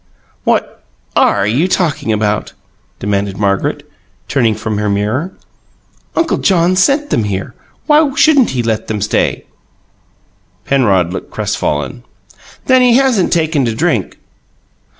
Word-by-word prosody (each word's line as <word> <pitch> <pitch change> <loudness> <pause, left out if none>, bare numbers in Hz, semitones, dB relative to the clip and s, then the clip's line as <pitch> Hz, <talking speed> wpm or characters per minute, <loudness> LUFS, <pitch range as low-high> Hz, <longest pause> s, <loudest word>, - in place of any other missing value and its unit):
"What - - -1 0.3
ARE 100 -1 +3
you 125 - +1
talking 165 -11 0
about?" 105 0 -1 0.4
demanded 100 -1 -2
Margaret, 100 -2 -1 0.4
turning 120 -5 +1
from 105 0 -3
her 105 0 -1
mirror. 110 - -1 0.8
"Uncle 330 -1 +1
John 180 -1 +2
sent 280 +10 +2
them 110 - +1
here. 100 +4 -4 0.3
Why 300 -1 +4
shouldn't 285 -6 +4
he 125 -2 -2
let 110 -1 -2
them 110 -1 -3
stay?" 105 +1 -1 1.2
Penrod 95 -10 +2
looked - - -6
crestfallen. 70 -5 -3 0.6
"Then 260 -1 +4
he 245 -2 +4
hasn't 255 -8 +2
taken 160 -4 +1
to 115 -2 -2
drink?" - - -1
115 Hz, 125 wpm, -14 LUFS, -, 1.2 s, Why